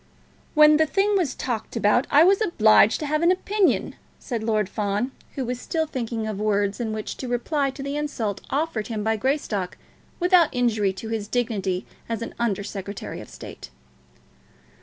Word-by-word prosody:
"When 300 0 +7
the 315 0 +3
thing 405 +5 +2
was 355 -8 0
talked 235 -4 -4
about 210 +6 +2
I 290 +2 +6
was 390 +4 +4
obliged 220 - +5
to - - -2
have 305 +1 0
an 340 - +4
opinion," 390 +1 +1 0.2
said 235 -4 -4
Lord 215 -2 +1
Fawn, 210 +4 -2 0.2
who 265 - -2
was 245 +1 -4
still 320 -1 -1
thinking 230 -6 -3
of 215 -2 -4
words 205 -1 0
in 230 -2 -2
which 215 -1 -4
to 260 - -5
reply 275 +4 0
to 270 +1 -7
the 280 +1 -3
insult 235 -9 -3
offered 280 -7 -1
him 220 -3 -3
by 220 +1 +1
Greystock 220 -6 -2 0.4
without 355 -3 +5
injury 225 -5 +1
to 205 +4 -7
his 220 -2 -3
dignity 205 -6 -1 0.2
as 230 0 -2
an - - -7
Under 205 -4 0
Secretary 200 0 -6
of - - -12
State. - - -10
235 Hz, 180 wpm, -24 LUFS, 215-295 Hz, 0.4 s, When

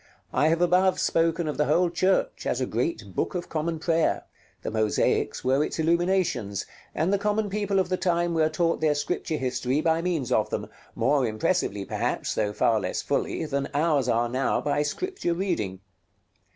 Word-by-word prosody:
I 150 - +3
have 165 +2 +2
above 185 +1 +3
spoken 165 0 +1
of 150 - -3
the 150 - +2
whole 175 -1 +2
church 185 +2 +1
as 125 - 0
a 130 - 0
great 115 - -3
Book - - -1
of 175 - -4
Common 165 +1 -2
Prayer; 165 +1 +1 0.4
the - - -3
mosaics 110 -1 +1
were 135 +3 +3
its - - -4
illuminations, 165 - +1 0.3
and 175 +5 +1
the 200 - +2
common 210 0 0
people 205 -1 0
of 190 -1 +1
the 185 - 0
time 175 -1 +1
were 160 -1 +3
taught 165 +1 0
their 155 -2 +3
Scripture 155 +2 -2
history 130 +1 -1
by 160 +1 +2
means 170 -8 -1
of - - +2
them, - - -4 0.3
more 130 +2 +2
impressively 110 - -1
perhaps, - - -2
though 105 - 0
far 110 +1 +2
less - - -3
fully, - - -1
than 140 -2 -2
ours 145 -4 +2
are 120 +1 +2
now 130 +3 0
by 145 0 0
Scripture 175 - -2
reading. 105 - -2
160 Hz, 180 wpm, -26 LUFS, 130-175 Hz, 0.4 s, I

